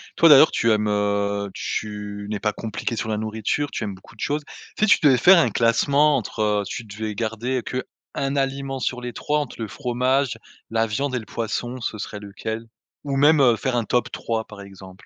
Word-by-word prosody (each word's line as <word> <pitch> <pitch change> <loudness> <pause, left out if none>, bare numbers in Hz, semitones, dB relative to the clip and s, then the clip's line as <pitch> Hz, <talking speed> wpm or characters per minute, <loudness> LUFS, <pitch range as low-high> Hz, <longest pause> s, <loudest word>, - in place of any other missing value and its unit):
Toi, 165 - +6
d'ailleurs 150 +1 +9
tu 115 -1 +2
aimes 105 0 +2
heu 100 -1 0
tu 105 -1 -4
n'es 105 - -2
pas 105 -1 0
compliqué 115 +3 -4
sur 115 0 -3
la 105 - 0
nourriture, 110 +7 -2
tu - - -3
aimes 100 - -3
beaucoup 95 +6 -17
de - - -26
choses. 150 +1 -1 0.4
Si 215 - +3
tu - - +6
devais 135 -4 +6
faire 180 +10 +7
un - - +2
classement 140 +5 +3
entre 105 -3 -1
tu 115 - -5
devais 105 +1 -5
garder 115 +4 -2
qu' 130 0 -3 0.3
1 135 +1 -1
aliment 135 0 -2
sur 125 0 -2
les 125 -1 -5
3 150 +6 -1
entre 145 -4 -5
le 110 - -2
fromage, 125 +2 0 0.3
la 115 0 +1
viande 130 +6 -2
et 125 - 0
le 110 - -10
poisson 120 +3 -4
ce 110 -1 -4
serait 105 +1 -6
lequel? 110 +3 -6 0.4
Ou 140 -1 -2
même, 150 +1 +5
heu, 120 -3 +5
faire 130 +1 -1
un 120 - +1
top 125 - 0
3 110 -1 -3
par 105 -1 -11
exemple. 95 -1 -13
115 Hz, 210 wpm, -23 LUFS, 105-135 Hz, 0.4 s, d'ailleurs